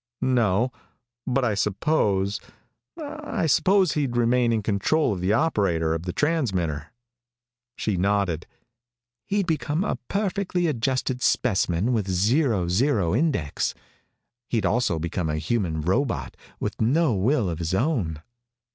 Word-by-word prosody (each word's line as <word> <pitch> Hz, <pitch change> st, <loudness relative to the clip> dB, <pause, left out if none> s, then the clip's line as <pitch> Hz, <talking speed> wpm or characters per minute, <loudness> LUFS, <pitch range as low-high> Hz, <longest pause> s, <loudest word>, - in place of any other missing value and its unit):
"No, 120 Hz, -2 st, +2 dB, 0.6 s
but 130 Hz, 0 st, +1 dB
I 110 Hz, -, +1 dB
suppose 100 Hz, -, +1 dB, 0.6 s
I 300 Hz, -, -4 dB
suppose 185 Hz, +4 st, +3 dB
he'd 135 Hz, -5 st, -1 dB
remain 120 Hz, 0 st, +3 dB
in 110 Hz, -2 st, 0 dB
control 105 Hz, +7 st, +1 dB
of 90 Hz, -, -5 dB
the 95 Hz, +2 st, +1 dB
operator 100 Hz, -, +1 dB
of 80 Hz, +2 st, -4 dB
the -, -, 0 dB
transmitter." 95 Hz, -, -1 dB, 0.9 s
She 105 Hz, -4 st, -1 dB
nodded. 95 Hz, -3 st, 0 dB, 0.8 s
"He'd 200 Hz, +2 st, 0 dB
become 155 Hz, 0 st, -1 dB
a -, -, -1 dB
perfectly 195 Hz, -3 st, -1 dB
adjusted 130 Hz, -2 st, -1 dB
specimen 100 Hz, -2 st, +1 dB
with 105 Hz, -4 st, 0 dB
a 95 Hz, -, -1 dB
zero 105 Hz, -, +2 dB
zero 100 Hz, -, +1 dB
index, 125 Hz, -, 0 dB
but -, -, -30 dB, 0.7 s
he'd 115 Hz, -5 st, 0 dB
also 115 Hz, -6 st, +1 dB
become 85 Hz, +1 st, -2 dB
a 75 Hz, -, -1 dB
human 80 Hz, -2 st, -1 dB
robot 90 Hz, -, -1 dB, 0.2 s
with -, -, -4 dB
no 140 Hz, +5 st, +3 dB
will 110 Hz, +3 st, +1 dB
of 85 Hz, -2 st, -3 dB
his 85 Hz, +2 st, -1 dB
own." 95 Hz, -, -1 dB
110 Hz, 135 wpm, -25 LUFS, 90-145 Hz, 0.9 s, suppose